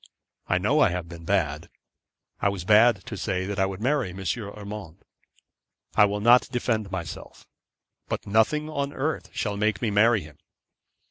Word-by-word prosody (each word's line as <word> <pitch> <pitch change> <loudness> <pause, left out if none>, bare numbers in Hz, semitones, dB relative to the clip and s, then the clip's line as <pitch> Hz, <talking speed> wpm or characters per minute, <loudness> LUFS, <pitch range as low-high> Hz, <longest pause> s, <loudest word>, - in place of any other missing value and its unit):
I 95 - +2
know 125 +12 +2
I 145 - +5
have 90 -1 -4
been 85 -1 -11
bad. 85 -4 -1 0.7
I 100 - +3
was 100 -3 -4
bad 110 0 +5
to 110 - -6
say 95 -1 -2
that 100 0 -4
I 95 - +3
would 95 -1 -6
marry 130 -1 0
M. 90 +2 -9
Urmand. 100 -3 -6 0.9
I 105 - +6
will 105 0 -2
not 120 +3 +5
defend 115 -4 -1
myself. 85 -4 -7 0.6
But - - -4
nothing 110 +9 +2
on 140 -2 -3
earth 155 +4 -3
shall 105 -2 -3
make 105 -1 +1
me 110 0 -1
marry 110 +1 +4
him. 75 -2 -14
105 Hz, 170 wpm, -25 LUFS, 95-115 Hz, 0.9 s, I